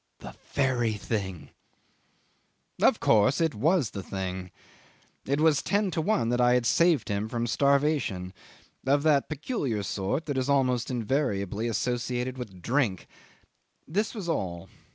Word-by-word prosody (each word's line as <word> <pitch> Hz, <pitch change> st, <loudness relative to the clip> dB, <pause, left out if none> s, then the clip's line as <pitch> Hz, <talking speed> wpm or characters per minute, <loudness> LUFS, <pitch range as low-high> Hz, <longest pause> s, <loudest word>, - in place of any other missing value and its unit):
"The -, -, -10 dB, 0.2 s
very 125 Hz, -5 st, +1 dB
thing.. 100 Hz, -4 st, -4 dB, 0.6 s
." -, -, -25 dB
'Of -, -, +4 dB
course 110 Hz, +4 st, +3 dB
it 165 Hz, -3 st, +1 dB
was 150 Hz, -, +1 dB
the 100 Hz, -, -5 dB
thing. 95 Hz, -1 st, -5 dB, 0.8 s
It 140 Hz, +2 st, +1 dB
was 155 Hz, -2 st, +4 dB
ten 200 Hz, -1 st, 0 dB
to 160 Hz, -, -1 dB
one 190 Hz, -, +1 dB
that 120 Hz, +1 st, +1 dB
I 125 Hz, 0 st, +5 dB
had 125 Hz, -1 st, +1 dB
saved 165 Hz, +1 st, +3 dB
him 105 Hz, +1 st, -2 dB
from 120 Hz, 0 st, -2 dB
starvation 140 Hz, -9 st, +1 dB, 0.5 s
of 140 Hz, +1 st, +3 dB
that 150 Hz, -3 st, +3 dB
peculiar 145 Hz, -, -2 dB
sort 100 Hz, -, -2 dB
that 145 Hz, -3 st, -1 dB
is 130 Hz, +2 st, -2 dB
almost 130 Hz, -3 st, +2 dB
invariably 115 Hz, -4 st, -1 dB
associated 125 Hz, +2 st, -2 dB
with 95 Hz, -8 st, -8 dB
drink. 120 Hz, -7 st, 0 dB, 0.8 s
This 205 Hz, +9 st, -1 dB
was 200 Hz, -6 st, -5 dB
all. 95 Hz, -, -3 dB
125 Hz, 145 wpm, -27 LUFS, 105-145 Hz, 0.8 s, I